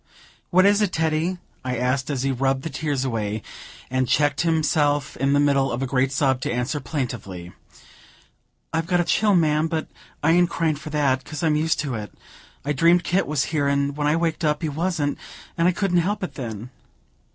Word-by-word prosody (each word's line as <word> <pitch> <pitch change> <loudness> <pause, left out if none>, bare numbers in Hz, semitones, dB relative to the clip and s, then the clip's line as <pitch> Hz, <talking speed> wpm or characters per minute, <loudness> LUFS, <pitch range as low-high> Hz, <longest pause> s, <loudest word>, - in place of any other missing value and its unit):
"What 185 +1 +5
is 205 +1 +4
it, 205 -3 +1
Teddy?" 160 +3 0 0.3
I 125 -1 -2
asked, 130 +3 0
as 135 -3 -1
he 135 - +1
rubbed 135 +1 0
the 160 - -4
tears 140 -1 -2
away, 110 -4 -2 0.5
and 130 0 +1
checked 145 +1 +2
himself 150 -3 +1
in 135 +2 +1
the 145 - +4
middle 140 -2 +2
of 120 +3 -2
a - - +1
great 130 0 +1
sob 135 -2 +1
to - - -2
answer 125 +5 -1
plaintively: 120 - -5 1.2
"I've 165 0 -1
got 180 -1 +2
a - - +3
chill, 205 +3 +2
ma'am, 155 -2 +3
but 160 -1 -2 0.4
I 160 - +4
ain't 175 +1 +4
cryin' 160 -2 0
for 155 +2 -8
that, 140 -3 +1
'cause 155 +1 -6
I'm 155 -2 +3
used 160 +2 +1
to 145 -4 -3
it. 105 -4 -5 0.5
I 145 - 0
dreamed 170 +5 +4
Kit 185 +2 +1
was 150 -2 0
here, 145 -2 +1
and 140 0 0
when 145 0 0
I 150 - +3
waked 165 0 -1
up 150 +1 +1
he 160 - 0
wasn't, 155 -1 -1 0.4
and 170 +1 +2
I - - +5
couldn't 180 -1 +1
help 205 +4 -1
it, 180 - -4
then." 115 -2 -6
145 Hz, 205 wpm, -23 LUFS, 130-165 Hz, 1.2 s, What